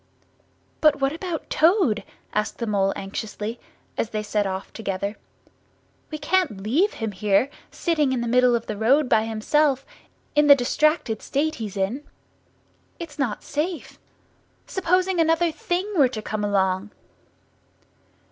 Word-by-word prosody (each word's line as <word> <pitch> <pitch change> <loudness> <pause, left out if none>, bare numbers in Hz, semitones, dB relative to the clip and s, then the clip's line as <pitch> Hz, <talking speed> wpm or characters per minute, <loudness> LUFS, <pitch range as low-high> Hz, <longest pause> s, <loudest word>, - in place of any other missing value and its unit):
"But 300 -2 +4
what 270 +1 +1
about 335 -1 -5
Toad?" 320 - +3 0.3
asked 210 +1 -1
the 235 - -3
Mole 195 -3 +1
anxiously, 210 +3 -5 0.4
as 225 - 0
they 215 0 -3
set 210 -1 0
off 190 +1 -5
together. 200 -1 -3 0.9
"We 310 - -4
can't 295 - 0
leave 315 - +2
him 225 -2 -3
here, 205 +7 +1 0.2
sitting 305 -6 0
in 255 -2 0
the 235 - -2
middle 250 0 +4
of 230 - -2
the 215 - -4
road 255 +7 +3
by 220 -2 +3
himself, 270 +5 +1 0.5
in 295 0 +4
the 285 - +10
distracted 265 -2 +1
state 310 +3 0
he's 205 -2 -5
in! 205 +9 -1 0.9
It's 315 -4 -9
not 240 -7 -1
safe. 320 +4 -4 0.7
Supposing 370 0 +1
another 330 +1 +3
Thing 350 +4 -2
were 280 -6 +5
to 220 -4 -5
come 215 -1 -3
along?" 195 -1 +1
250 Hz, 140 wpm, -24 LUFS, 210-310 Hz, 0.9 s, the